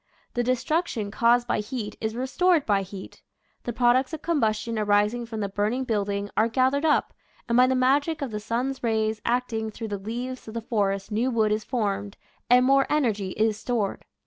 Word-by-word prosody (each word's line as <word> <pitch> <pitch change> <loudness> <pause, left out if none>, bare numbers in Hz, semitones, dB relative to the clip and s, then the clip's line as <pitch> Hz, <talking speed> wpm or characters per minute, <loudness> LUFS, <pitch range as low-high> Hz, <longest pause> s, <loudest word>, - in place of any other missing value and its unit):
The 245 - 0
destruction 255 - -1
caused 240 +2 +3
by - - 0
heat 210 0 -5
is 220 0 -2
re 250 +2 -2
stored 340 +2 +2
by 200 -2 +2
heat. 190 0 -9 0.4
The 240 - -1
products 250 +4 +2
of 315 - -6
combustion 225 -7 0
arising 210 +3 +1
from 220 -2 -5
the 200 - -1
burning 210 +6 -1
building 205 -3 -2
are 220 +2 +3
gath 260 +3 +2
ered 280 +2 0
up, 300 - +2 0.3
and 235 - +1
by 250 +1 +6
the 260 - +1
magic 285 +4 +2
of 265 - -4
the 210 - -3
sun's 255 +5 -2
rays 220 -2 0
acting 235 -2 0
through 220 +1 -7
the 205 -1 -3
leaves 245 +5 -5
of 220 - -8
the 230 - -2
forest 200 -3 -1
new 230 +5 +1
wood 220 -3 +1
is 215 0 0
formed, 205 -5 -2 0.3
and 250 +1 +6
more 275 +1 +4
energy 225 -10 +1
is 215 -1 +1
stored. 220 -5 -2
230 Hz, 200 wpm, -25 LUFS, 210-255 Hz, 0.4 s, by